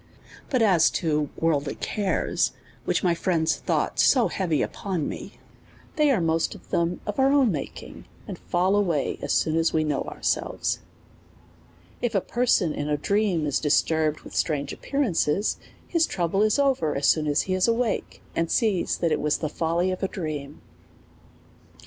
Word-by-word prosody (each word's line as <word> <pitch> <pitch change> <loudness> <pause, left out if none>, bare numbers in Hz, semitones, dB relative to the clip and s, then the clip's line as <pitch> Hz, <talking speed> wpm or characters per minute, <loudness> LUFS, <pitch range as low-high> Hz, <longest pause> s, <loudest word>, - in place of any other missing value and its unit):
But 255 -4 +2
as 180 -7 +5
to 150 -3 0
worldly 150 -3 0
cares, 200 -3 -1 0.3
which - - 0
my 175 -2 +3
friends 170 -2 0
thought - - 0
90 245 -3 +1
heavy 165 -6 0
upon 185 -7 -3
me, - - -7 0.6
they 300 -1 +3
are 255 -7 +3
most 165 -1 0
of - - -16
them 170 +1 0
of 210 +4 -4
our 265 +1 +4
own 275 -6 +4
making, 150 - -7 0.2
and - - -7
fall 185 +3 +1
away 175 -8 0
as - - -3
soon 155 - +2
as 165 0 +2
we 155 - +2
know 150 -3 -1
ourselves. - - -2 1.2
If 240 -3 -1
a - - +5
person 225 -10 +1
in 145 +1 -3
a 150 - +1
dream 195 -1 +1
is 145 -2 0
disturbed 155 0 +1
with - - -12
strange 145 -3 -1
ap - - -12
pearances, 205 - 0 0.3
his 330 -2 +2
trouble 180 +2 0
is 215 0 +3
over 270 - +1
as 140 - -1
soon 155 -1 +3
as 145 -1 +2
he 185 - -2
is 185 +3 +2
awake, 230 -1 -1
and 165 0 0
sees 210 -7 +1
that 170 -2 0
it - - +1
was 150 0 +1
the 155 - -3
folly 170 +4 0
of 185 - -4
his 195 - -1
dream. 150 -5 -6
170 Hz, 175 wpm, -25 LUFS, 155-210 Hz, 1.2 s, as